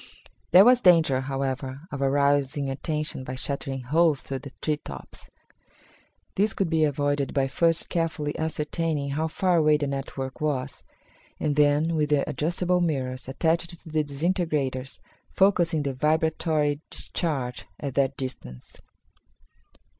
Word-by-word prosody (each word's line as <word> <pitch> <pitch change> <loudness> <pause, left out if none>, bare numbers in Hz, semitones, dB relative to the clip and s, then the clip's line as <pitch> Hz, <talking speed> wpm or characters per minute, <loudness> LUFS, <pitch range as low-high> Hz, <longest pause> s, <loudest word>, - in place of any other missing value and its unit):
There 185 +4 +8
was 250 0 +6
danger, 165 - +5
however, 135 0 -3
of 140 - -5
arousing 140 0 +1
attention 150 0 -2
by 130 0 -5
shattering 135 0 -4
holes 155 +2 +2
through 135 -1 -5
the 140 - -9
tree 150 -1 0
tops. - - -10 1.0
This 205 +2 +1
could 185 -4 -1
be 160 -1 +3
avoided 145 -2 0
by 135 -1 +2
first 165 +4 +1
carefully 160 -3 -2
ascertaining 155 -2 -2
how 155 +3 -1
far 180 +2 +1
away 155 -1 +4
the 145 - -2
network 135 -1 -5
was, 145 -4 -2 0.6
and 150 -2 0
then 150 +2 +3
with 150 -1 +1
the 145 -2 +2
adjustable 175 +5 0
mirrors 130 -7 -2
attached 170 +4 -1
to - - -13
the 155 -1 +1
disintegrators 145 -4 -2 0.4
focusing 175 -5 +3
the 140 -1 -2
vibratory 155 0 +1
discharge 135 -8 -3
at 140 -3 -4
that 135 0 +1
distance. 65 - -8
150 Hz, 135 wpm, -26 LUFS, 135-160 Hz, 1.0 s, There